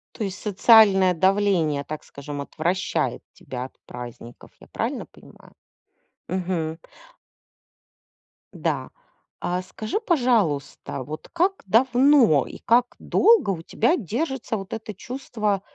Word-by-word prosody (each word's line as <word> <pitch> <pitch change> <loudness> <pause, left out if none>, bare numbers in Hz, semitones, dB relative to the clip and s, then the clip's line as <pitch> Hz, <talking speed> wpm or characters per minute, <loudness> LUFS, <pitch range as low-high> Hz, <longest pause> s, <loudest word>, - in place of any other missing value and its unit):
То 220 - -3
есть 190 -1 -5
социальное 200 -3 +5
давление, 180 -5 +2
так 155 0 -6
скажем, 140 0 -7
отвращает 175 +6 -1
тебя 125 0 -7
от - - -13
праздников, 120 -1 -10
я - - -16
правильно - - -3
понимаю? - - -18 0.7
Мгм. 175 -3 -2 1.8
Да, - - -2 0.5
а 180 +1 -2
скажи, 215 - -4
пожалуйста, 215 - 0
вот 155 +4 -8
как 370 +3 +1
давно 245 - +4
и - - -9
как 240 +1 +2
долго 450 - +4
у 165 -3 -4
тебя 240 - +1
держится 250 - -3
вот 195 +1 -8
это 220 -1 -6
чувство, 215 -3 -3
195 Hz, 115 wpm, -24 LUFS, 160-240 Hz, 1.8 s, социальное